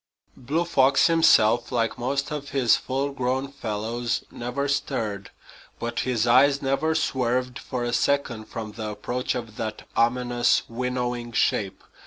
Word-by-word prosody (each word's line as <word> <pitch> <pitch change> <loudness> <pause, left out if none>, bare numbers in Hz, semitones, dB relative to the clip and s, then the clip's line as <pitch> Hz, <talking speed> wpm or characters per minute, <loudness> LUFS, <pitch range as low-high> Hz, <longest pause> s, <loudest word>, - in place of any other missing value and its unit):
Blue 155 +7 -1
Fox 135 -4 +4
himself, 120 -9 +4
like 115 -2 0
most 140 +4 -1
of 145 -1 -5
his 130 -4 +3
full 135 +2 -2
grown 130 0 -1
fellows, 115 -1 -3
never 125 +4 -3
stirred. 110 -8 -2 0.5
But 120 0 -3
his 120 -3 0
eyes 135 +4 +5
never 140 +4 0
swerved 125 -3 0
for 125 -1 -4
a 120 0 -2
second 125 -7 0
from 110 -1 -6
the 110 0 -5
approach 120 +5 -3
of 115 -3 -6
that 110 -1 -4
ominous, 120 +1 +2
winnowing 120 0 -3
shape. 100 -4 0
125 Hz, 140 wpm, -25 LUFS, 115-135 Hz, 0.5 s, eyes